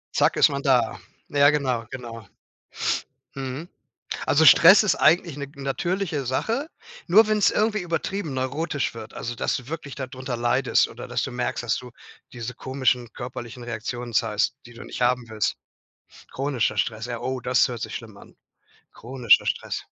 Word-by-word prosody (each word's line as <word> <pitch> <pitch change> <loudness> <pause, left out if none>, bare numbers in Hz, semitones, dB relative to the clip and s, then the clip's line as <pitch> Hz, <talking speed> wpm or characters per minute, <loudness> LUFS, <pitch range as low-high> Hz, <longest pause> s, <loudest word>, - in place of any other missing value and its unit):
Zack, - - +3
ist - - +6
man - - -3
da. - - +2 0.3
Ja 145 0 +5
genau, 130 -6 0
genau. 115 -4 -8 1.1
Mhm. 135 +4 -5 0.6
Also, 160 +3 +4
Stress 180 +6 +9
ist 210 - +3
eigentlich 165 -1 +3
'ne 140 -1 -5
natürliche 155 +3 -2
Sache, 230 - -1 0.4
nur 215 +5 +7
wenn's 210 -2 +3
irgendwie 215 -1 +1
übertrieben 175 0 -3
neurotisch 140 +1 -2
wird, 110 -1 -9
also, 120 - -4
dass - - 0
du 125 -1 -9
wirklich 155 -3 -6
da 130 - -4
drunter 130 -1 -5
leidest 120 +2 +2
oder - - -9
dass - - -1
du - - -4
merkst, 125 0 -2
dass 115 -1 +1
du 125 -1 -8 0.4
diese 120 0 -6
komischen 130 -3 -1
körperlichen 125 -1 -7
Reaktionen 120 +1 -5
zeigst, 110 +2 +1
die 120 - -14
du 115 - -10
nicht - - -8
haben 125 -1 +1
willst. 110 -1 -1 0.8
Chronischer 130 -6 -1
Stress, 110 +1 -1
ja 120 -1 -4
oh, 130 0 -3
das 125 0 +3
hört 120 -3 -6
sich 110 - -4
schlimm 110 -4 -9
an - - -16 0.6
chronischer 120 -2 +3
Stress. - - -2
130 Hz, 165 wpm, -24 LUFS, 120-145 Hz, 1.1 s, Stress